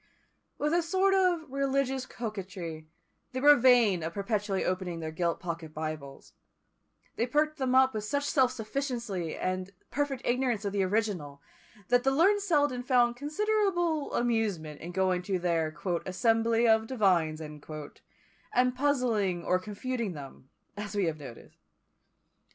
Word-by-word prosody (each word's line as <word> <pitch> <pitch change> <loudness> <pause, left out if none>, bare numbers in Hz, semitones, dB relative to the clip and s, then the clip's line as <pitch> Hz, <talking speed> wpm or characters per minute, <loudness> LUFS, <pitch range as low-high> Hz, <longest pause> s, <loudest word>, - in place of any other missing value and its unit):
With 300 +2 0
a 345 - +4
sort 380 +4 +2
of 365 -4 +2
religious 270 -1 -1
coquetry, 185 -8 -6 0.5
they 255 - -2
were 290 +2 +8
vain 240 -8 +5
of 165 +1 -4
perpetually 205 -1 -1
opening 180 -2 -2
their 160 -1 -4
gilt 170 +1 -1
pocket 165 -3 -6
Bibles; 155 -3 -6 0.8
they 235 - +1
perked 305 +4 +1
them 260 -1 +1
up 265 0 +5
with 215 -1 -3
such 285 +7 -1
self 260 -4 +3
sufficiency 230 - -3
and 185 0 -2 0.2
perfect 285 -3 -2
ignorance 240 -4 0
of 200 - -2
the 200 - +1
original, 185 -8 -1 0.5
that 245 0 +4
the 270 - +3
learned 370 +9 +4
Selden 290 -9 +1
found 245 -1 +3
considerable 345 - 0
amusement 210 -11 -1
in 175 - -6
going 185 0 +1
to 185 +1 -1
their 165 -3 -1 0.3
"assembly 225 +4 +2
of 220 0 +4
divines," 180 -10 +2
and 150 -2 -8 1.1
puzzling 245 -10 0
or 185 - +2
confuting 215 +2 -4
them, 135 -3 -11 0.3
as 205 0 -6
we 200 -2 +2
have 160 -2 -2
noticed. 130 -5 -12
220 Hz, 140 wpm, -29 LUFS, 180-265 Hz, 1.1 s, were